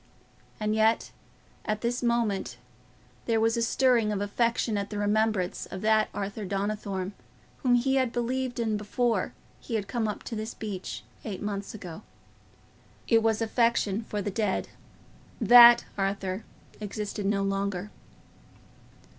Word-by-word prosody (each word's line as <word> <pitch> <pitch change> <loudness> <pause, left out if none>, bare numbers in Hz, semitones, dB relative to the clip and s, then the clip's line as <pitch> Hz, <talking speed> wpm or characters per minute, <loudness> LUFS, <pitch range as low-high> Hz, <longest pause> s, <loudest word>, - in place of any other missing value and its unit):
And 215 0 0
yet, 220 +1 +2 0.5
at 215 0 -2
this 245 +1 -1
moment, 235 -5 0 0.7
there 225 -1 +2
was 225 +1 +2
a 235 - 0
stirring 235 -2 +3
of 205 - -1
affection 230 +2 0
at 200 0 -2
the 210 - -5
remembrance 205 -2 0
of 190 - -7
that 215 0 +3
Arthur 205 +2 -4
Donnithorne 200 -1 -3 0.5
whom 250 -3 +4
he 265 +3 +2
had 260 -3 +1
believed 245 +1 -2
in 220 -2 0
before 230 +3 0 0.3
he 230 - -5
had 205 -3 -2
come 235 -3 -1
up 210 - -4
to 230 - -5
this 215 +1 -5
beech 185 - -5 0.2
eight 195 -4 -5
months 205 0 -4
ago. 180 -2 -8 1.1
It 225 -2 +5
was 225 0 +1
affection 225 -2 +1
for 205 -2 -3
the 205 - -2
dead: 210 -1 -1 0.7
that 240 -1 +9
Arthur 195 0 -2 0.4
existed 210 -1 -4
no 200 -1 +1
longer. 195 0 -2
215 Hz, 140 wpm, -28 LUFS, 200-235 Hz, 1.1 s, that